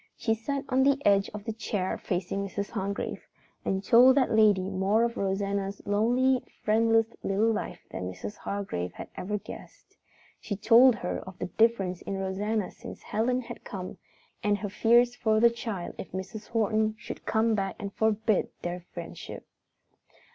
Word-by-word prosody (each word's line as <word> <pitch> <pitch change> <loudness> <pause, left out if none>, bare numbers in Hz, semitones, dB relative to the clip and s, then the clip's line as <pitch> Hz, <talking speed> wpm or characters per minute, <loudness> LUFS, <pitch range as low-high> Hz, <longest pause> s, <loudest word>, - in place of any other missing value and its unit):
She 225 - +1
sat 275 +5 -3
on 260 0 +2
the 275 +1 +4
edge 200 -1 +4
of 210 -1 -8
the 225 - -3
chair 210 -4 -2
facing 185 +2 -2
Mrs. 200 +1 -4
Hargrave 200 -2 -4 0.4
and 190 0 -1
told 250 +6 +7
that 265 - +3
lady 205 -4 +4
more 195 +4 +2
of 235 0 0
Rosanna's 200 0 -1
lonely, 245 +5 +2 0.2
friendless 225 +1 +4 0.2
little 210 +4 +2
life - - -4
than 90 0 -4
Mrs. 95 +2 -7
Hargrave 195 - -4
had - - -8
ever 210 +3 -2
guessed. - - -12 0.4
She 205 - -4
told 230 +4 +6
her 180 -5 -3
of 190 -1 -10
the - - -3
difference 195 -4 +1
in 200 - -4
Rosanna 195 +2 -1
since - - -10
Helen 250 +4 0
had 235 - -9
come, 185 -3 -7 0.4
and 205 -1 +2
her 205 0 -4
fears 235 +4 +4
for 220 -2 +2
the 235 +1 +6
child 225 -6 -5
if - - -7
Mrs. 205 +3 -6
Horton 220 -1 +1
should - - -9
come 225 +1 +2
back 195 -2 -1
and 200 -1 -6
forbid 220 -1 +1
their 175 +1 -3 0.2
friendship. - - -8
210 Hz, 165 wpm, -28 LUFS, 195-230 Hz, 0.4 s, told